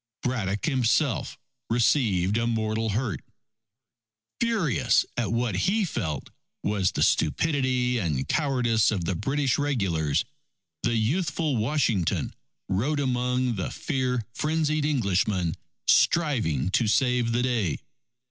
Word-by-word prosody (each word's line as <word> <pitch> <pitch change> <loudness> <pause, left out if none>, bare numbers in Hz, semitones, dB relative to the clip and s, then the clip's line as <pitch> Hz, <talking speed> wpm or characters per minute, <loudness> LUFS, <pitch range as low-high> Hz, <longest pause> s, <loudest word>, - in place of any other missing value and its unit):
Braddock 105 -6 -1
himself 130 -2 +1 0.3
received 110 -6 +2
a 115 +1 +1
mortal 110 -1 -1
hurt. 105 - -2 1.2
Furious 215 - +2
at 115 -5 -1
what 115 -2 0
he 195 - +1
felt 90 - -4 0.3
was 100 -3 +1
the - - 0
stupidity 125 - +1
and 75 -9 -1
cowardice 125 -7 +2
of 95 -6 -1
the 95 - 0
British 135 - 0
regulars, 95 - 0 0.6
the 120 0 0
youthful 145 +5 0
Washington 115 - 0 0.3
rode 125 +11 0
among 125 -2 0
the 95 - -2
fear 130 -4 -2
frenzied 155 0 0
Englishmen 100 - +1 0.3
striving 110 - +2
to 115 - +2
save 125 0 +2
the 120 +1 +1
day. 115 - 0
120 Hz, 110 wpm, -26 LUFS, 100-140 Hz, 1.2 s, received